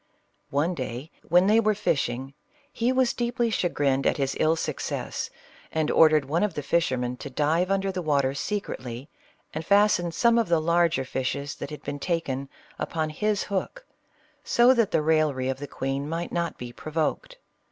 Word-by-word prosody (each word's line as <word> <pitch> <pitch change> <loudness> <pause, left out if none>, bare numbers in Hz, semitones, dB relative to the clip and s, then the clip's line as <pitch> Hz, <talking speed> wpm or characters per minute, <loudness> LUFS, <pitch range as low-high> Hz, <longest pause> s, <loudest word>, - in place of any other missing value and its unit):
One 150 +6 +1
day 130 0 -5
when 180 +3 +4
they 215 +3 +5
were 215 -1 +2
fishing, 135 - -1 0.4
he 235 +2 +1
was 260 -2 +2
deeply 240 -1 0
chagrined 145 -8 +1
at - - +1
his 135 -2 -1
ill 160 +1 +3
success, 160 - -3 0.4
and 155 -1 0
ordered 155 -3 +5
one 155 +5 0
of 210 -1 0
the 145 - -3
fishermen 130 -6 0
to 140 - -7
dive 155 +7 +1
under 195 0 +1
the 185 -1 -3
water 140 -4 +1
secretly, 135 - -4 0.4
and 160 - -4
fasten 200 -2 +3
some 235 +7 +3
of 230 - +1
the 170 -1 +4
larger 170 -4 +2
fishes 140 +2 -3
that - - -6
had 150 - -8
been 145 0 -4
taken 140 -5 -2 0.3
upon 160 -2 -2
his 210 +5 0
hook, 205 - -4 0.6
so 240 +2 +5
that 230 -5 +2
the 155 - +1
raillery 150 -5 +2
of 130 0 -2
the 145 - -6
queen 135 +2 -3
might 165 +2 -3
not 170 -1 -2
be 120 -1 -7
provoked. 165 - -3
160 Hz, 175 wpm, -26 LUFS, 140-195 Hz, 0.6 s, they